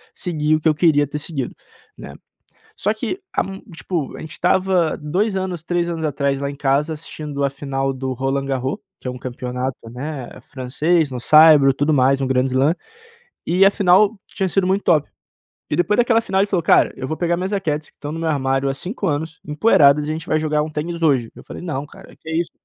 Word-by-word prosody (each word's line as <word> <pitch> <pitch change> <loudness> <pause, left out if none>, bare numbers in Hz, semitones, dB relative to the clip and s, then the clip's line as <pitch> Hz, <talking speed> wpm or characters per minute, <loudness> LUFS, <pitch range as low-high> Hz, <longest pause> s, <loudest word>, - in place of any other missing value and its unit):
segui 155 -3 0
o - - 0
que 155 - 0
eu 155 - +5
queria 150 -3 +3
ter 145 +1 -5
seguido." 145 -4 -4 0.4
Né. - - -10 0.6
Só 210 - 0
que 240 - -4
a - - +2 0.3
tipo, 160 -1 -4
a - - -9
gente 155 - -8
estava 180 -2 +1
2 185 +8 -1
anos 185 -4 -3
3 175 0 0
anos 165 -2 -3
atrás 140 -2 0
lá 140 0 -2
em 140 - -9
casa 140 +3 +1
assistindo 150 -2 -6
a 140 - +1
final 135 -1 -2
do 130 0 -4
Roland 135 +2 -2
Garros 135 0 -2 0.2
que - - -6
é 125 0 -5
campeonato, 125 +1 -4
né, 130 +1 -6
francês, 145 +4 0
no 125 - -4
saibro, 155 -1 +7
tudo 145 +3 0
mais 135 -1 +3
um 135 - 0
grand 130 -1 +2
slam. 135 +4 +2 0.7
E 180 +3 +4
afinal 200 +2 +4
tinha 190 - -2
sido 185 +1 +1
muito 190 +2 +1
top. 150 -3 +2 0.6
E - - 0
depois 205 +4 +2
daquela 235 -1 +3
final 190 -4 0
ele 200 - +3
falou: 185 -5 0
"Cara - - +4
eu 130 - -5
vou 155 - -2
pegar 175 0 0
minhas 185 +2 -3
raquetes 155 -7 -2
que - - -45
estão 145 +1 -6
no 165 - -5
meu 165 - -1
armário 135 -2 0
há 135 - -1
5 190 - -5
anos, 160 +1 -2
empoeiradas 150 -3 +4
e - - -3
a - - 0
gente 160 +1 -5
vai 155 - +2
jogar 150 -1 0
um 155 - -4
tênis 165 +3 -4
hoje." 135 -8 +2
Eu - - -12
falei: - - -9
"Não 150 -5 -4
cara, - - -15
que 160 - -14
é 160 - -2
isso? 170 0 -1
150 Hz, 220 wpm, -20 LUFS, 135-175 Hz, 0.7 s, saibro